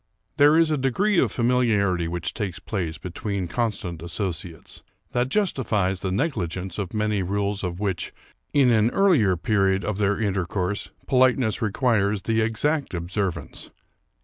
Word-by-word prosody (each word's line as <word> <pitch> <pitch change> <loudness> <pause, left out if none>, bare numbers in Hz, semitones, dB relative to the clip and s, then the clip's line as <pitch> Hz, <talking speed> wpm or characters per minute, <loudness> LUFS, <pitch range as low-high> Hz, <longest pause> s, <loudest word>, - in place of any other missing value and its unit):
There 145 +2 +6
is 165 -1 +4
a 150 - +1
degree 180 - +2
of - - +2
familiarity 110 -8 +2
which 85 0 -3
takes 100 -5 -3
place 90 -6 -4
between 95 +1 -4
constant 95 -6 -3
associates, 85 -1 -5 0.3
that 125 +1 0
justifies 110 - +1
the 95 - -3
negligence 95 - -2
of 95 -3 -3
many 105 -1 0
rules 100 +2 -1
of 90 -1 -3
which, 95 -4 -2 0.4
in 135 -4 +4
an 110 0 +4
earlier 130 - +3
period 95 -2 +1
of 105 -1 -2
their 100 0 +1
intercourse, 95 -1 -1 0.2
po 130 - 0
liteness 125 -4 +3
requires 105 -3 +1
the 110 -1 +1
exact 135 - 0
observance. 90 +1 -3
105 Hz, 145 wpm, -24 LUFS, 95-120 Hz, 0.4 s, There